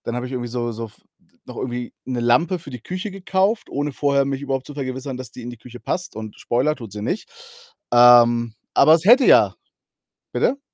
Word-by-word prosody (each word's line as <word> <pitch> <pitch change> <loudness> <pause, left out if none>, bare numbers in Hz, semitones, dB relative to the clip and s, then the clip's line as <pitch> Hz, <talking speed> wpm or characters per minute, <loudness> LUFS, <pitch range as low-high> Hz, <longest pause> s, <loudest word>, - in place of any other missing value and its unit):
habe 125 0 -3
ich 125 - -7
irgendwie 120 -2 -4
so 120 -1 -3
so 115 +1 -6
f 105 -1 -16 0.5
noch - - -10
irgendwie 125 -1 -5
'ne 125 -2 -3
Lampe 125 +10 +2
für 145 -4 -11
die 125 -3 -8
Küche 185 - -5
gekauft, 195 +3 -1
ohne 145 +1 -2
vorher 140 0 +1
mich 135 0 -3
überhaupt 135 -2 -3
zu 145 - -9
vergewissern, 130 -1 -5
dass 130 -3 -8
die 125 - -10
in 120 - -6
die 120 - -11
Küche 120 +1 -12
passt 180 +7 -4
und 110 -1 -8
Spoiler: 135 +6 0
Tut 115 -7 -10
sie 105 +1 -6
nicht. 195 - -3 0.6
Ähm, 120 -1 +6 0.2
aber 155 +3 +6
es 165 - -3
hätte 250 +5 +7
ja - - +5 0.8
bitte? 280 - 0
130 Hz, 205 wpm, -21 LUFS, 120-150 Hz, 0.8 s, hätte